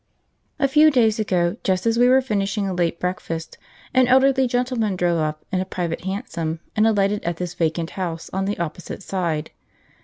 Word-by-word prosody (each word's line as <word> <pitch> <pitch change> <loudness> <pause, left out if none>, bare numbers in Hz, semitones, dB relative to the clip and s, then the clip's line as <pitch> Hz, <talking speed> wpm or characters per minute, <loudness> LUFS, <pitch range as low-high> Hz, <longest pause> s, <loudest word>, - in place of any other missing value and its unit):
A 275 - +2
few 300 +3 +6
days 230 -6 +3
ago, 180 -5 +1
just 185 0 0
as 230 0 +2
we 245 +1 +5
were 260 +1 +5
finishing 200 -3 -1
a 190 - -2
late 170 -2 0
breakfast, 165 -2 -4 0.3
an 255 -1 +4
elderly 265 +1 +4
gentleman 245 -4 0
drove 175 -2 +1
up 155 0 -3
in 185 - 0
a - - 0
private 175 -2 -4
hansom, 170 -5 -3 0.2
and 215 +1 +4
alighted 205 -1 +1
at 170 -1 -2
this 180 0 -4
vacant 165 -1 -1
house 170 -4 -4
on 190 +1 -1
the 205 +1 -2
opposite 170 +3 -5
side. 170 -6 -2
190 Hz, 185 wpm, -22 LUFS, 170-230 Hz, 0.3 s, few